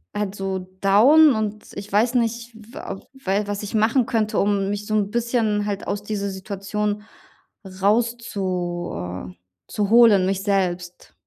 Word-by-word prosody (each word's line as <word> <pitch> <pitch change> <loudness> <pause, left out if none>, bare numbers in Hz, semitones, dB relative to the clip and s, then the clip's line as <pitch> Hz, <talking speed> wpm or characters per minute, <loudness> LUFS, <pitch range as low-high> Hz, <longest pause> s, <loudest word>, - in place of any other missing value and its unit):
halt 205 -2 -2
so 195 -1 -3 0.2
down 265 +10 +6
und 215 -1 -3
ich 200 +1 -8
weiß 225 +5 +2
nicht, 235 0 -1 0.2
wa 195 - -7
we 205 -6 -1
was 205 0 -3
ich 205 +1 -5
machen 225 +4 +3
könnte, 215 -2 0
um 200 -1 +1
mich 205 0 -4
so 215 - -1
'n 205 -1 0
bisschen 230 -3 0
halt 200 -1 -3
aus 205 - -2
dieser 205 -1 -3
Situation 205 +2 -3 0.6
rauszu 190 -3 -1 0.4
äh, 90 - -20 0.3
zu 205 -2 -2
holen, 225 -5 +6
mich 195 0 -1
selbst. 180 -3 -2
205 Hz, 150 wpm, -22 LUFS, 195-225 Hz, 0.6 s, down